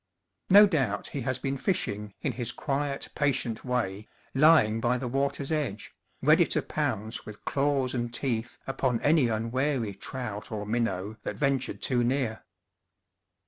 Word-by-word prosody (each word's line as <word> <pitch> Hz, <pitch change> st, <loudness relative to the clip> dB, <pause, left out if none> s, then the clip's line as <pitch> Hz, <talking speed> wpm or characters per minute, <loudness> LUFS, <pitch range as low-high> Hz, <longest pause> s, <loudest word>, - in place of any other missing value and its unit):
No 205 Hz, +2 st, +9 dB
doubt 135 Hz, -, 0 dB
he 140 Hz, -, -4 dB
has 130 Hz, +1 st, 0 dB
been 135 Hz, +1 st, -3 dB
fishing, 105 Hz, -, -1 dB
in 145 Hz, -, 0 dB
his 120 Hz, -1 st, -2 dB
quiet, 140 Hz, 0 st, -2 dB
patient 130 Hz, -6 st, 0 dB
way, 110 Hz, -5 st, -2 dB, 0.3 s
lying 135 Hz, -7 st, +5 dB
by 120 Hz, +2 st, +2 dB
the 125 Hz, 0 st, -4 dB
water's 140 Hz, +3 st, -1 dB
edge, 135 Hz, -10 st, -2 dB, 0.3 s
ready -, -, +5 dB
to -, -, 0 dB
pounce 110 Hz, +3 st, -2 dB
with 105 Hz, -1 st, -11 dB
claws 140 Hz, -2 st, +1 dB
and 120 Hz, -2 st, -2 dB
teeth 120 Hz, -2 st, -2 dB
upon 130 Hz, -3 st, 0 dB
any 150 Hz, -4 st, +4 dB
unwary 115 Hz, +1 st, -1 dB
trout 110 Hz, +2 st, -6 dB
or 105 Hz, -1 st, -3 dB
minnow 105 Hz, -2 st, -1 dB
that -, -, -4 dB
ventured 140 Hz, -3 st, -1 dB
too 125 Hz, -2 st, +2 dB
near. 125 Hz, -2 st, -1 dB
125 Hz, 145 wpm, -28 LUFS, 110-140 Hz, 0.3 s, No